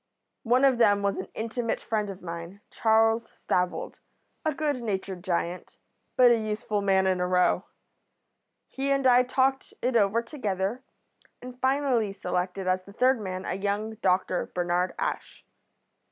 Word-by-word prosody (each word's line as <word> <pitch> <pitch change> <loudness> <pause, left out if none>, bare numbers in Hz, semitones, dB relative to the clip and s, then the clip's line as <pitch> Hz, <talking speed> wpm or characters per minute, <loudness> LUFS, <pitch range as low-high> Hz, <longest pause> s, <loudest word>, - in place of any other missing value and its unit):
One 250 +3 +3
of 260 -3 +3
them 205 -3 +4
was 200 0 0
an - - -5
intimate 230 +1 -2
friend 210 -2 -2
of 190 -1 -9
mine, 170 +3 -7
Charles 225 +1 +2
Stavold, 180 0 -2 0.4
a 310 - +1
good 290 -3 -2
natured 190 -4 -4
giant, 175 -1 -3 0.4
but 250 -1 +7
a 235 - +3
useful 215 -1 -2
man 190 -1 +3
in 185 -1 +1
a 180 - 0
row. 180 0 +2 1.0
He 275 +1 -3
and 275 -1 +1
I 250 -1 +7
talked 265 +1 0
it 250 0 -1
over 220 +1 +3
together, 215 -3 -3 0.6
and 250 0 -11
finally 260 -6 +1
selected 180 0 -3
as 185 0 +1
the 200 +2 -15
third 255 +1 +2
man 185 -1 -5
a - - -2
young 205 +3 -2
doctor, 185 -1 +1
Bernard 175 +1 0
Ash. - - -4
210 Hz, 155 wpm, -27 LUFS, 185-250 Hz, 1.0 s, but